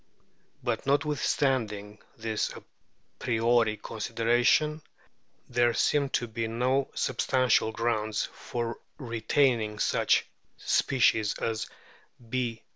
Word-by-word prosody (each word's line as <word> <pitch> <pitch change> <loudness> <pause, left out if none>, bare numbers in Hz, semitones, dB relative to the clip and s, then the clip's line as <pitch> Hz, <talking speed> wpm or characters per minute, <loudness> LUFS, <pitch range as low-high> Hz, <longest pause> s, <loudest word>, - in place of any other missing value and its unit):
But - - -2
notwithstanding 130 -8 0 0.2
this 110 -1 -1
a - - -11 0.6
priori 115 -2 +2
consideration 120 +8 +1 0.7
there 120 -1 +2
seem 145 -2 +2
to 120 - -4
be 115 0 -3
no 130 +4 0
sub - - -1
stantial 130 -4 +3
grounds 110 -2 -1
for 120 -1 -4 0.2
retaining 115 -2 +1
such - - +2 0.3
species 110 -5 +2
as 110 0 -2 0.6
B. 120 -2 -2
115 Hz, 95 wpm, -28 LUFS, 110-130 Hz, 0.7 s, stantial